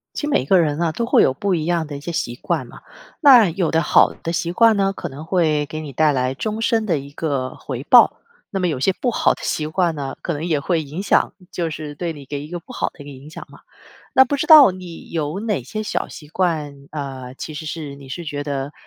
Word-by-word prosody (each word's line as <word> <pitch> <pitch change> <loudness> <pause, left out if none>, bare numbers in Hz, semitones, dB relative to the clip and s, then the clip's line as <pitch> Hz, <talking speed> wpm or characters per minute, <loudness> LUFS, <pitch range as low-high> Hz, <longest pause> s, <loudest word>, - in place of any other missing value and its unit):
其 295 - -3
每 280 - +1
个 185 +6 +4
人 150 -2 0
呢 170 -2 0
都 235 +7 -2
会 - - +5
有 - - +3
不 195 +6 -1
一 160 -3 -1
样 170 -1 0
的 145 -1 -6
一 - - -8
些 170 +4 -5
习 120 -7 -2
惯 120 - -2
嘛， - - -14 0.4
那 255 - +8
有 170 0 -1
的 160 0 +2
好 - - +4
的 165 - -2
习 170 0 -2
惯 225 +3 +5
呢， 195 -1 +1
可 - - -6
能 145 +3 -9
会 160 -4 +1
给 155 +2 -6
你 150 -3 -7
带 155 +3 +3
来 130 -1 0
终 215 +9 -3
身 225 -1 +1
的 170 -7 +1
一 140 +1 -9
个 140 -5 -2
回 130 -1 -6
报， 245 +6 +6 0.3
那 195 - -2
么 180 - +1
有 145 -6 -2
些 190 - +2
不 245 - +1
好 - - +2
的 - - -16
习 155 - -1
惯 170 +1 0
呢， 140 -3 -5
可 175 - -2
能 150 0 -4
也 165 -4 +1
会 165 +2 0
影 155 +6 -6
响， - - +2 0.2
就 170 -2 -2
是 150 -1 -6
对 170 +2 -3
你 145 -3 -11
给 145 +1 -5
一 - - -14
个 175 - -4
不 215 - -13
好 - - -1
的 - - -21
一 - - -8
个 145 - -9
影 140 +2 -12
响 - - -9
嘛。 - - -15 0.5
那 265 - +8
不 285 - -2
知 - - -2
道 305 - +9
你 180 -2 -10
有 155 +1 -2
哪 210 - -1
些 215 - -5
小 215 - -3
习 150 - -11
惯， 150 -5 -2
啊， 135 -4 -6
其 155 +2 -7
实 155 +2 -6
是 150 -3 -5
你 140 -1 -13
是 170 +6 -6
觉 145 -2 -4
得， 140 0 -4
160 Hz, 285 characters per minute, -21 LUFS, 145-185 Hz, 0.5 s, 道